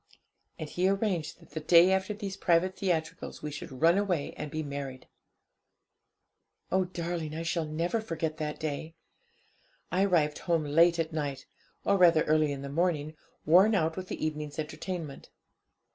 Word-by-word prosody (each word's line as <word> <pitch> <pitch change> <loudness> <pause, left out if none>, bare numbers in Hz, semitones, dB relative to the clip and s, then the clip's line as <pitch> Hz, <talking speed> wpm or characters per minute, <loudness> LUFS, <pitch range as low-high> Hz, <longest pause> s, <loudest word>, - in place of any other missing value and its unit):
And 155 - -5
he 180 +5 +1
arranged 195 -7 -1
that 165 - -19
the 160 - -4
day 170 +3 +6
after 190 +1 +1
these 200 -2 -5
private 185 0 +2
theatricals 165 -6 -3
we 150 - -3
should 145 - -7
run 170 +4 +6
away 180 -8 -1
and 150 - -5
be 155 +2 -3
married. 140 -2 -6 1.6
'Oh, 190 0 +2
darling, 170 -3 -4
I 165 - -3
shall 165 -1 -1
never 170 +8 -1
forget 165 -6 -3
that 150 -2 -4
day! 155 +1 -4 1.0
I 185 +3 +3
arrived 155 -6 +2
home 170 -3 0
late 165 +4 +4
at 165 -1 -2
night, 140 -3 -3 0.4
or 200 - +3
rather 170 -3 +6
early 155 -1 +2
in 140 -1 -5
the - - -5
morning, 155 0 -1 0.3
worn 190 +7 +6
out 160 -3 +1
with 185 -1 -6
the - - -3
evening's 150 -1 -4
entertainment. 155 -1 -5
165 Hz, 160 wpm, -29 LUFS, 150-180 Hz, 1.6 s, day